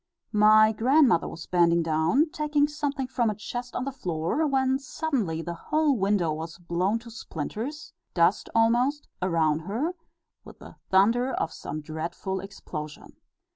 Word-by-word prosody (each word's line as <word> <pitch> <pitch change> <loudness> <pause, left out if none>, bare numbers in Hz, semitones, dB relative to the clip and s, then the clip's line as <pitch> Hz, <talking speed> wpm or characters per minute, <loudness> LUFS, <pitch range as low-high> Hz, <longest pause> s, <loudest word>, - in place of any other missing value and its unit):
My 215 +1 +6
grandmother 245 - +3
was 165 - -8
bending 170 -1 +3
down, 165 - +2
taking 295 -1 +1
something 290 -2 -3
from 250 -3 0
a 210 - -2
chest 245 +4 -6
on 255 - -2
the 275 - -3
floor, 180 - -1
when 265 -1 +1
suddenly 250 - -2
the 170 - -4
whole 300 - +1
window 195 -6 +1
was 160 +2 -6
blown 180 +5 0
to 230 0 -11
splinters 220 - -6 0.2
dust 175 +3 +2
almost 240 +6 +2
around 160 -4 +2
her, 225 - -2 0.5
with - - -13
the - - -13
thunder 230 +7 +3
of 165 - -2
some 155 - -6
dreadful 170 +5 -4
explosion. 165 -6 -8
215 Hz, 145 wpm, -26 LUFS, 170-265 Hz, 0.5 s, My